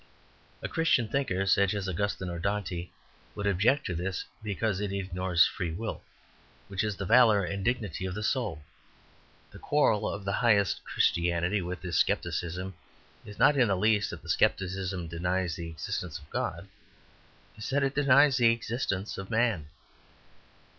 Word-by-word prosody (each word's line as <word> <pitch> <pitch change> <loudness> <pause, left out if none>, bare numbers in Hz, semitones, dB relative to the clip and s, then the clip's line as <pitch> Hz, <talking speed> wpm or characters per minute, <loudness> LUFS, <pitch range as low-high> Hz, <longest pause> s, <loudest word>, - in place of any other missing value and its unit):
A - - -1
Christian 165 -8 +2
thinker 105 -7 -1
such 100 +1 +3
as 100 -2 -3
Augustine 95 +1 -2
or 85 - -5
Dante 95 -2 -2 0.5
would 105 - -4
object 105 +9 +2
to 90 - -2
this 90 +2 -3 0.2
because 105 -1 -1
it 105 -2 -2
ignores 95 -2 +2
free 90 - -3
will, 110 +6 -4 0.7
which 100 0 -1
is 105 -2 -1
the 100 - -5
valour 105 -1 +5
and 95 +2 -3
dignity 105 -7 -1
of 90 - -5
the 105 - -4
soul. 105 - -1 0.9
The - - -12
quarrel 125 -8 +2
of 100 -1 -6
the 100 - 0
highest 105 -5 +3
Christianity 85 +3 +1
with 90 +1 -5
this 85 -3 0
scepticism 90 +3 -1 0.5
is 105 - -10
not 145 - +5
in 130 -4 +4
the 100 - +2
least 105 +1 +2
that - - -8
the - - -11
scepticism 95 -2 0
denies 90 +1 -1
the 85 -1 -5
existence 80 +1 -4
of 75 - -15
God; - - -3 0.9
it - - -17
is - - -4
that 140 +1 +1
it 135 0 0
denies 140 -1 +5
the 120 -2 +5
existence 115 -4 -2
of 95 - -7
man. 110 -9 +1
100 Hz, 165 wpm, -29 LUFS, 90-110 Hz, 0.9 s, valour